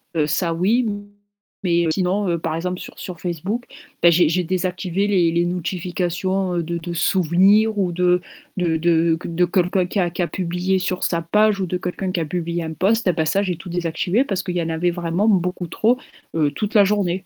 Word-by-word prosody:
heu, 155 -2 +2
ça 170 +3 0
oui. 220 +8 +2 0.8
Mais 170 -2 +2
heu, - - +1
sinon, 190 +3 0
heu, 170 -1 0
par 160 - -2
exemple 180 +2 -3
sur - - -10
sur 180 -3 -7
Facebook, 190 +8 -3 0.4
bah 170 - +8
j'ai 170 -1 +4
j'ai 180 +2 +1
désactivé 185 +1 -1
les 180 -5 +3
les 170 +1 +1
notifications, 180 +1 -2
heu, 170 - 0
de 170 +1 -3
de 170 +1 -6
souvenirs 190 +6 +3
ou 185 -3 +1
de 180 +1 +2 0.4
de 170 -3 +1
de 165 0 +3
q 165 - -8
de 175 +1 +2
comme 175 0 +1
quelqu'un 185 -1 0
qui 175 +2 -4
a - - 0
publié 180 +2 -1
sur 185 0 -2
sa 170 -1 0
page 210 +4 +2
ou 185 - -1
de 180 - -1
quelqu'un 185 +1 -3
qui 185 - -1
a 165 - -1
publié 170 +1 -3
un 160 0 -5
post, 210 +6 +1
ah - - +5
bah 160 0 0
ça 195 +6 +2
j'ai 180 -4 -2
tout 180 +2 -10
désactivé 175 +6 0
parce 195 -9 -2
qu'il 180 -2 -4
y - - +1
en 165 - -3
avait 165 +2 0
vraiment 175 +4 -1
beaucoup 180 -3 +1
trop, 230 +9 +1 0.4
heu, 155 -3 +2
toute 205 +9 -4
la 210 -3 +7
journée. 190 -2 0
180 Hz, 220 wpm, -21 LUFS, 170-190 Hz, 0.8 s, bah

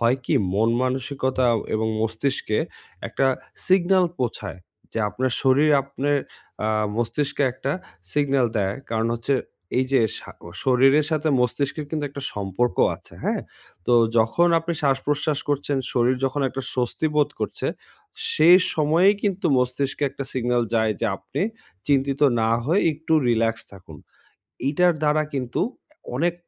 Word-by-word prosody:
হয় 120 +2 +3
কি? - - +1 0.2
মন-মানসিকতা, 130 +3 0 0.3
এবং 110 +1 0
মস্তিষ্কে 110 0 -1 0.5
একটা 135 - +1 0.4
সিগনাল 185 0 +4
পোঁছায় 110 -6 -3 0.3
যে, - - -2
আপনার 125 +5 -1
শরীর 140 +3 +4
আপনের 140 +1 -1 0.4
অ্যা 110 - 0 0.3
মস্তিষ্কে 140 +5 -1
একটা 130 +2 -3 0.4
সিগনাল 140 -3 +2
দেয়। 100 -1 0 0.2
কারণ 115 0 0
হচ্ছে 120 +4 0 0.4
এই 130 - +3
যে, 135 - +5 0.2
শা - - -11
ক - - -23 0.2
শরীরের 135 +3 +4
সাথে 155 0 0
মস্তিষ্কের 140 +4 -1
কিন্তু 155 -2 -2
একটা 140 0 -7
সম্পর্ক 100 +1 -1 0.2
আছে। - - -16
হ্যাঁ? - - 0 0.4
তো 120 - +4 0.2
যখন 140 +11 +3
আপনি 165 +1 -3
শ্বাস-প্রশ্বাস 145 +2 0
করছেন, 145 0 0 0.2
শরীর 125 +1 +3
যখন 135 +2 -1
একটা 135 +1 -5
স্বস্তি 125 +5 -1
বোধ 150 -1 +4
করছে, - - -3 0.7
সেই 180 - +7 0.2
সময়েই 165 +6 +4
কিন্তু 195 -3 0
মস্তিষ্কে 130 +3 -1
একটা 140 0 -6
সিগনাল 120 -1 +1
যায় 110 -1 +2
যে, 115 - +1
আপনি 95 0 -6 0.5
চিন্তিত 140 0 +1 0.2
না 110 0 +2
হয়ে 170 +9 +2
একটু 160 +2 -4 0.2
রিল্যাক্স 115 -1 +1
থাকুন। 90 -5 -12 0.7
এইটার 175 +5 +3
দ্বারা 150 0 +3
কিন্তু 125 -3 -2 0.6
অনেক 170 +5 +1
135 Hz, 140 wpm, -23 LUFS, 120-150 Hz, 0.7 s, সেই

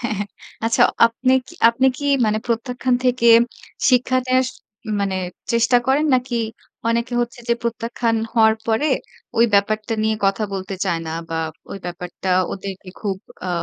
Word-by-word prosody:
হ্যাঁ, 235 -3 -2
হ্যাঁ, 205 0 -3 0.4
আচ্ছা। 230 - +3 0.2
আপনি 255 +3 0
কি 345 - -13
আপনি 235 +3 +2
কি 290 - -5 0.2
মানে 215 0 +1
প্রত্যাখ্যান 245 +2 0
থেকে 250 -1 +2 0.6
শিক্ষা 255 +1 +3
নেওয়ার 255 0 +3 0.5
মানে 195 -1 0 0.4
চেষ্টা 235 +1 +4
করেন। 275 +4 +3
নাকি 250 -1 0 0.5
অনেকে 235 +1 0
হচ্ছে 240 0 -3
যে, 235 - +4
প্রত্যাখ্যান 230 0 -1 0.2
হওয়ার 220 -1 +5
পরে 225 +6 +1 0.5
ওই 230 - +7
ব্যাপারটা 215 +2 +1
নিয়ে 220 0 +1
কথা 195 +2 +1
বলতে 195 0 -4
চায় 165 - 0
না - - -4 0.2
বা 165 - -3 0.3
ওই 195 - -5
ব্যাপারটা 175 +2 -6 0.2
ওদেরকে 195 -1 -7
খুব 200 -3 -2 0.3
আ - - -2
230 Hz, 155 wpm, -21 LUFS, 205-245 Hz, 0.6 s, ওই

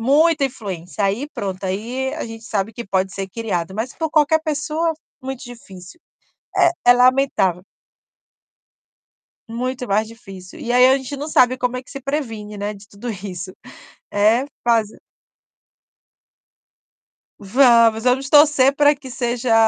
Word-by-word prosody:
Muita 300 +5 +3
influência. 200 -7 -5
Aí, 210 +9 -1
pronto, 190 -1 -4
aí 235 +8 -3
a - - -4
gente 225 0 -10
sabe 215 -2 -2
que 235 +2 -8
pode 190 -1 0
ser 195 -1 -4
criado, 190 -5 -3
mas 225 +4 -3
por 320 - -2
qualquer 310 +1 +3
pessoa 310 +1 -1 0.3
muito 265 -1 -6
difícil. 235 - -13 0.6
É 345 - +5 0.2
é - - +10
lamentável. 250 -8 +2 1.9
Muito 250 +2 -4
mais 210 +2 +1
difícil. 195 -5 -12
E 240 - -3
aí 250 +1 +7
a 265 - +4
gente 265 +1 -6
não 285 +2 -5
sabe 255 -2 +4
como 250 0 -1
é - - -5
que - - -20
se 275 -1 -8
previne, 225 -7 -4
né, 205 +1 -3
de 200 0 -14
tudo 210 +4 -8
isso. 190 -3 -7 0.6
É, 215 +5 +3 0.2
faz 230 -3 +2 2.5
Vamos, 230 0 +4
vamos 265 +2 +1
torcer 290 -2 +6
pra 290 0 +4
que 265 -2 -11
seja 240 -1 -1
240 Hz, 145 wpm, -20 LUFS, 205-270 Hz, 2.5 s, é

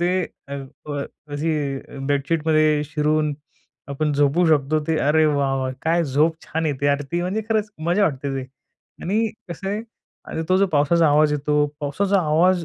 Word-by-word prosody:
ते 175 +1 +2 0.4
अ, - - -8
अ, 140 +1 -6 0.3
अशी 155 +3 -1 0.5
बेडशीटमध्ये 155 +1 +2
शिरून 150 0 0 0.5
आपण 150 +2 -1
झोपू 145 +5 +3
शकतो. 155 0 +2
ते 160 -1 +1
अरे 155 +1 +4
वाह! 140 -2 +1
वाह! 130 0 -2
काय 165 +1 +2
झोप 150 +4 +2
छान 160 0 -2
येते. 145 -1 -1
अरे! 140 0 +2
ती 175 - +1
म्हणजे 190 +5 -1
खरंच 215 -1 0 0.2
मजा 180 +4 +3
वाटते 140 -3 -2
ते 130 -1 -4 0.6
आणि 215 +5 +1 0.2
कसं 185 +3 -5
आहे 210 +2 -2 0.5
आणि 160 - -3
तो 185 - +4
जो 200 - +4
पावसाचा 160 0 +3
आवाज 150 +1 +4
येतो. 150 0 +1
पावसाचा 190 +7 +1
आवाज 170 +3 +3
155 Hz, 165 wpm, -22 LUFS, 145-170 Hz, 0.6 s, अरे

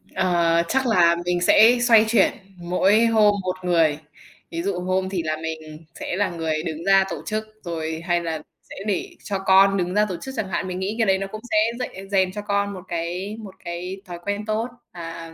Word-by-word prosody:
Ờ, 170 -2 +2
chắc 265 +5 +1
là 170 -6 +4
mình 175 0 0
sẽ 225 +6 +6
xoay 230 -3 +6
chuyển 235 - +4 0.3
mỗi 190 +6 +3
hôm 215 -2 +4
một 185 0 -2
người. 165 -4 +2 0.5
Ví 165 - -3
dụ 190 -2 -1
hôm 185 +1 -1
thì 180 -4 -2
là 155 0 -2
mình 160 0 -7
sẽ - - -3
là 200 -1 +1
người 160 -2 -2
đứng 165 +1 -5
ra 195 0 +5
tổ - - -5
chức 215 0 -2 0.2
rồi, 160 -2 -4
hay 175 -1 +1
là 160 -1 -3 0.3
sẽ - - -9
để 370 - -1
cho 195 -2 -3
con 195 +1 +5
đứng 180 0 -1
ra 210 +1 +3
tổ 180 - -3
chức 265 - -7
chẳng 200 -3 -2
hạn. 185 +1 -2
Mình 180 0 -4
nghĩ 200 +3 -2
cái 225 - +3
đấy 190 0 +4
nó 195 0 -4
cũng 215 - -7
sẽ 215 - +3 0.2
dạy 195 -5 -6
rèn 190 -2 +2
cho 210 - -5
con 200 -1 -1
một 185 - -8
cái 180 +5 -4
một 200 -4 -10
cái 180 +3 -5
thói 175 -1 -8
quen 205 +1 -2
tốt 220 +2 -1 0.3
và 165 -1 -8
185 Hz, 220 wpm, -23 LUFS, 170-205 Hz, 0.5 s, sẽ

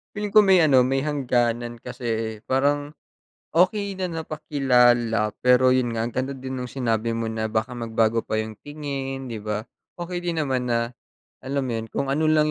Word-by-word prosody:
Feeling 210 0 -3
ko 215 0 +6
may 190 -3 +6
ano 130 -5 +5
may 135 +1 +1
hangganan, 120 -5 -1
kasi 115 -3 -3
parang 145 +2 +1 0.6
okey 195 +3 +2
na 185 -1 -3
napakilala 125 -8 +2
pero 125 0 +5
yon 125 -2 +1
nga 115 - -1
ang 120 - -2
ganda 130 +3 -2
din 130 0 -6
ng 125 - -4
sinabi 115 -3 -1
mo 115 -1 -2
na 110 0 -2
baka 110 +3 -1
magbago 115 -1 0
pa 110 - -3
yong 110 -1 -8
tingin, 135 -3 -5
'di 115 - -4
ba? 105 0 -3 0.3
Okey 175 0 -5
din 170 -3 -1
naman 130 -3 -1
na 115 0 0 0.5
alam 135 +1 -2
mo 120 -3 -2
yun, 110 - -5
kung 135 +4 -3
ano 155 +3 +1
lang 155 -1 +3
130 Hz, 180 wpm, -24 LUFS, 115-145 Hz, 0.6 s, ko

